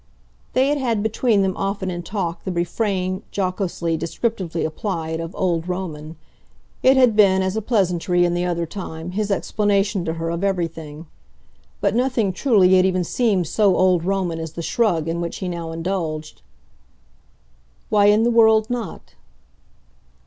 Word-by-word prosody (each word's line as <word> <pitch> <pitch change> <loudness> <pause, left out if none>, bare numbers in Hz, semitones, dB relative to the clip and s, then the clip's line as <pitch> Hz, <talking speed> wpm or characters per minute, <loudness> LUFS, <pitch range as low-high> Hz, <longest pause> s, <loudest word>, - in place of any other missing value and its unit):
They 260 +2 +3
had 290 0 +1
had 230 -6 0
between 220 -1 +2
them 190 -1 0
often 195 -1 -2
in 175 0 -4
talk 175 -2 -4
the 190 - -3
refrain, 185 +1 -1
jocosely, 185 -3 -2
descriptively 170 0 -2
applied, 160 -1 -3
of 165 +1 -6
"old 175 -3 -1
Roman." 160 -4 -5 0.7
It 265 +1 +5
had 250 -4 +5
been, 190 -3 +5
as 190 +1 -1
a 220 - -1
pleasantry, 180 -5 +1
in 175 - 0
the 175 0 -1
other 170 -1 -1
time, 165 -1 -7
his 210 +2 -2
explanation 200 -1 0
to 160 - -1
her 165 0 -3
of 170 +3 -3
everything; 165 -5 -3 0.8
but - - +1
nothing, 240 -5 +1
truly, 195 -5 +4
had 185 - +4
even 185 -1 0
seemed 200 -1 +1
so 200 +3 +2
old 180 -2 +3
Roman 185 -3 -1
as 160 -1 -6
the 170 - -5
shrug 170 -7 +1
in 170 +1 -2
which 170 - -4
he 190 - -4
now 170 -2 -4
indulged. 165 -2 -4 1.5
"Why 205 -1 +4
in 210 +2 +5
the 240 - +3
world 220 -1 +4
not?" 240 -4 -5
185 Hz, 160 wpm, -21 LUFS, 170-210 Hz, 1.5 s, It